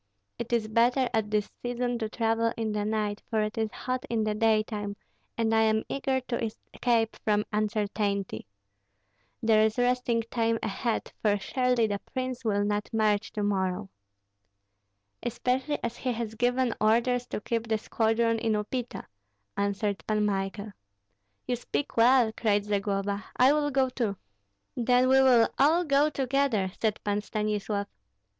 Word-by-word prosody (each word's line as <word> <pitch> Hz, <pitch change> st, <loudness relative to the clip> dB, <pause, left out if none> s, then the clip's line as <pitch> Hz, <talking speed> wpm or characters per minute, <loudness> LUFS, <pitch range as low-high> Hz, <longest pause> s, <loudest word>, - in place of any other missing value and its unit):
It 235 Hz, 0 st, -5 dB
is 230 Hz, -2 st, +1 dB
better 240 Hz, +4 st, +2 dB
at 220 Hz, -2 st, 0 dB
this 210 Hz, -1 st, 0 dB
season 245 Hz, 0 st, -2 dB
to 220 Hz, -2 st, -2 dB
travel 225 Hz, 0 st, +1 dB
in 225 Hz, -1 st, -1 dB
the 210 Hz, 0 st, -1 dB
night, 210 Hz, -1 st, -1 dB
for 220 Hz, -2 st, +1 dB
it 215 Hz, 0 st, -3 dB
is 220 Hz, -1 st, -1 dB
hot 255 Hz, 0 st, -3 dB
in 225 Hz, -2 st, 0 dB
the 215 Hz, 0 st, 0 dB
daytime, 215 Hz, -2 st, 0 dB, 0.4 s
and 225 Hz, -1 st, +1 dB
I 220 Hz, -, +4 dB
am 220 Hz, 0 st, +2 dB
eager 270 Hz, -1 st, 0 dB
to 240 Hz, -2 st, -3 dB
escape 225 Hz, +1 st, -1 dB
from 210 Hz, -1 st, +2 dB
uncertainty. 205 Hz, -, -1 dB, 1.0 s
There 220 Hz, -1 st, +5 dB
is 220 Hz, +1 st, +1 dB
resting 245 Hz, -1 st, +1 dB
time 230 Hz, -1 st, +1 dB
ahead, 225 Hz, +3 st, -2 dB
for 205 Hz, -1 st, +3 dB
surely 250 Hz, +3 st, +1 dB
the 205 Hz, -2 st, -2 dB
prince 255 Hz, +1 st, -5 dB
will 205 Hz, -3 st, +1 dB
not 205 Hz, 0 st, -1 dB
march 215 Hz, -2 st, +1 dB
to 210 Hz, -, -2 dB
morrow." 195 Hz, -1 st, -1 dB, 1.3 s
"Especially 255 Hz, +4 st, -1 dB
as 235 Hz, 0 st, -3 dB
he 255 Hz, -, -2 dB
has 225 Hz, -1 st, -4 dB
given 245 Hz, +1 st, +1 dB
orders 240 Hz, +3 st, +2 dB
to -, -, -4 dB
keep 230 Hz, +2 st, -2 dB
the 220 Hz, -1 st, +1 dB
squadron 225 Hz, +1 st, +1 dB
in 225 Hz, -1 st, 0 dB
Upita," 230 Hz, +4 st, -3 dB, 0.5 s
answered 200 Hz, 0 st, -1 dB
Pan 215 Hz, -1 st, +1 dB
Michael. 200 Hz, +1 st, -2 dB, 0.8 s
"You 250 Hz, -, +1 dB
speak 260 Hz, +4 st, -4 dB
well!" 235 Hz, 0 st, +5 dB
cried 205 Hz, -2 st, +1 dB
Zagloba; 200 Hz, 0 st, -1 dB
"I 260 Hz, +3 st, +6 dB
will 295 Hz, -1 st, +1 dB
go 265 Hz, -1 st, +2 dB
too." 235 Hz, -6 st, -2 dB, 0.6 s
"Then 250 Hz, +1 st, +3 dB
we 265 Hz, 0 st, +6 dB
will 245 Hz, -3 st, +6 dB
all 315 Hz, +6 st, +4 dB
go 290 Hz, -1 st, +3 dB
together," 265 Hz, -8 st, 0 dB
said 220 Hz, -2 st, +1 dB
Pan 205 Hz, 0 st, 0 dB
Stanislav. 210 Hz, -1 st, -2 dB
225 Hz, 155 wpm, -28 LUFS, 210-245 Hz, 1.3 s, I